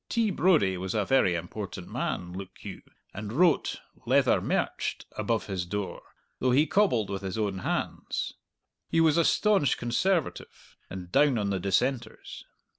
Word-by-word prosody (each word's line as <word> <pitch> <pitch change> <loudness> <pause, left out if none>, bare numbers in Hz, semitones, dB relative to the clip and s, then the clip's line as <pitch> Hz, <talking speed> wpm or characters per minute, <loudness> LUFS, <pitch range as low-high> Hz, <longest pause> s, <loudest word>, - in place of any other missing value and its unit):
T. 230 -3 +1
Brodie 155 - +3
was 95 +3 -4
a 105 -2 +1
very 115 -9 +3
important 90 +1 -6
man, 90 0 -3
look 95 0 -9
you, - - -7 0.3
and 105 +1 -6
wrote 170 +7 +2 0.3
"Leather - - +4
Mercht." - - -2
above 110 +1 -1
his 95 -3 -3
door, 100 +2 -4 0.4
though 130 - +1
he 135 +5 +4
cobbled 140 - +2
with 100 0 -3
his 95 +1 -4
own 100 -3 -1
hands. - - -3 0.6
He 165 - +2
was 160 -2 +4
a 170 - +5
staunch 200 -5 +3
Conservative, 160 +8 -2
and 90 -2 -8
down 145 0 +4
on 100 -2 -1
the 95 - -1
Dissenters. 115 +5 -2
110 Hz, 155 wpm, -28 LUFS, 95-150 Hz, 0.6 s, a